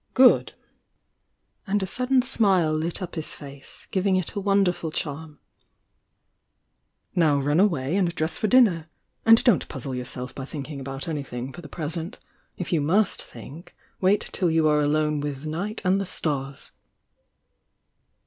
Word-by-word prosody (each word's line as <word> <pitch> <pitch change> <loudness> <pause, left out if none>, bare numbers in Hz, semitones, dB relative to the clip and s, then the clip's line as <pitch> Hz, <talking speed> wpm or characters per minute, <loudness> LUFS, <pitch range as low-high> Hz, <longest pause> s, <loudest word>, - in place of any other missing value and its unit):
"Good!" 255 -1 +5 1.1
And 200 0 +1
a - - 0
sudden 250 +6 +1
smile 195 -10 +2
lit 165 +4 -2
up 180 - -6
his 160 -3 -5
face, 140 -2 -11
giv 190 +1 0
ing 190 - +3
It 185 -3 -1
a - - -2
wonderful 195 -4 +1
charm. 155 0 -5 1.8
"Now 155 -5 +3
run 145 +4 +1
away 165 -6 +2
and 180 -4 +1
dress 160 +1 0
for 215 - 0
dmner! 195 -10 +4 0.4
Wid 225 0 +7
don't 235 -8 +3
puzzle 135 -1 -5
yourself 125 0 -5
by 135 - -6
thinking 145 0 -6
about 135 +1 -5
any 150 -3 -2
thmg 125 0 -6
for 175 - -9
the 150 - -11
present. 165 +2 -5 0.4
If 180 - -3
you 160 - +2
must 190 +8 +2
think 135 - -12 0.2
'*''« - - -35
'Vy°" 190 -2 +1
"""e 160 - +1
alone 150 -1 +2
with 145 0 -4
night 185 +8 -3
and 190 +2 +3
the 195 - -4
stars!" 140 -5 -3
160 Hz, 155 wpm, -25 LUFS, 145-190 Hz, 1.8 s, Wid